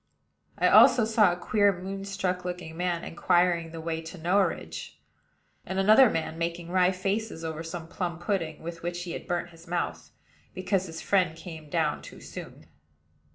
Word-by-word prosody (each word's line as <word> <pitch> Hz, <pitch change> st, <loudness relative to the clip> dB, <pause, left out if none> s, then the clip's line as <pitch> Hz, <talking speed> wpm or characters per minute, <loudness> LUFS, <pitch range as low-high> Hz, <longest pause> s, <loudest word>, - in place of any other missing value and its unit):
I -, -, +3 dB
also 245 Hz, -4 st, +7 dB
saw 220 Hz, -4 st, +4 dB
a -, -, -1 dB
queer 205 Hz, +3 st, +3 dB
moonstruck 195 Hz, -1 st, -3 dB
looking 180 Hz, -3 st, -5 dB
man 175 Hz, -1 st, -1 dB
inquiring 175 Hz, -1 st, +2 dB
the 165 Hz, -, -7 dB
way 160 Hz, 0 st, -3 dB
to 165 Hz, +3 st, -9 dB
Norridge; 185 Hz, +4 st, -1 dB, 0.7 s
and 190 Hz, -, -5 dB
another 215 Hz, +6 st, +7 dB
man 160 Hz, -1 st, -3 dB
making 170 Hz, 0 st, -3 dB
wry 180 Hz, -1 st, +4 dB
faces 195 Hz, -2 st, -2 dB
over 160 Hz, 0 st, -4 dB
some 165 Hz, 0 st, -6 dB
plum 170 Hz, -1 st, -3 dB
pudding, 170 Hz, -4 st, -2 dB
with 165 Hz, 0 st, -6 dB
which 175 Hz, +1 st, -3 dB
he 175 Hz, -, -6 dB
had -, -, -6 dB
burnt 175 Hz, 0 st, -2 dB
his 165 Hz, +1 st, -16 dB
mouth, 175 Hz, 0 st, -3 dB, 0.5 s
because 185 Hz, 0 st, 0 dB
his 160 Hz, -1 st, -7 dB
friend 180 Hz, -5 st, +2 dB
came 160 Hz, -3 st, -9 dB
down 155 Hz, -2 st, 0 dB
too -, -, -11 dB
soon. -, -, -10 dB
175 Hz, 165 wpm, -28 LUFS, 165-190 Hz, 0.7 s, also